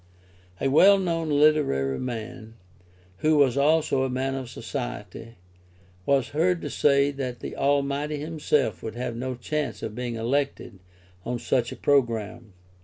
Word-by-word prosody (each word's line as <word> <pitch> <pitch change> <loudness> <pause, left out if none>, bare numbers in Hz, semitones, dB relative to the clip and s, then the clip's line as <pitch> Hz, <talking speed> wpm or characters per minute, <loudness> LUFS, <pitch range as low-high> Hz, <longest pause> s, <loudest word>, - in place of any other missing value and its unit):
A - - 0
well 190 +9 +6
known 165 -4 -1
literary 145 - +2
man[, 115 -2 -6 0.6
who 155 +7 +2
was 135 -4 +4
also 145 -1 +2
a 130 - 0
man 130 +1 -2
of 130 -2 -5
society,] 115 - -6 0.7
was 135 -3 +2
heard 170 +4 +1
to - - -4
say 140 -1 +3
that 130 -3 -5
the - - -7
Almighty 140 +2 0
himself 150 - -1
would 110 -1 -6
have 120 -1 -4
no 130 +2 -4
chance 150 +4 -3
of 110 - -4
being 120 0 -4
elected 125 -3 -2 0.4
on 120 +4 -3
such 120 0 0
a - - -6
programme. 115 -6 0
135 Hz, 145 wpm, -25 LUFS, 120-150 Hz, 0.7 s, well